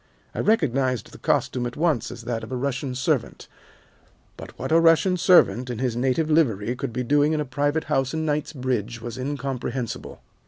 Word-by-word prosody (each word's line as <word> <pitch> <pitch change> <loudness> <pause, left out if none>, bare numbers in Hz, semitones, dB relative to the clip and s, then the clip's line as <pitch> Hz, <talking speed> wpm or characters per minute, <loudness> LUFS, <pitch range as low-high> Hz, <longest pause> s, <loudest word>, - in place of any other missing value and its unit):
I - - -6
recognized 135 - +1
the - - -13
costume 125 -1 0
at 120 - -8
once 150 -8 +1
as 115 - -9
that 115 -1 -3
of 110 - -8
a - - -2
Russian 130 0 -2
servant, 135 -2 -1 0.9
but - - -11
what - - -4
a 165 - +6
Russian 165 +3 +4
servant 165 -9 +4
in 120 - -4
his 125 -2 -1
native 130 +6 +1
livery 120 -8 +1
could 120 - -4
be 125 +2 -2
doing 145 +4 +3
in 155 - 0
a 150 - -1
private 145 +4 0
house 135 0 0
in 160 0 -2
Knightsbridge 130 -6 -2
was 120 +2 -7
incomprehensible. 130 -3 -4
130 Hz, 185 wpm, -24 LUFS, 120-150 Hz, 0.9 s, a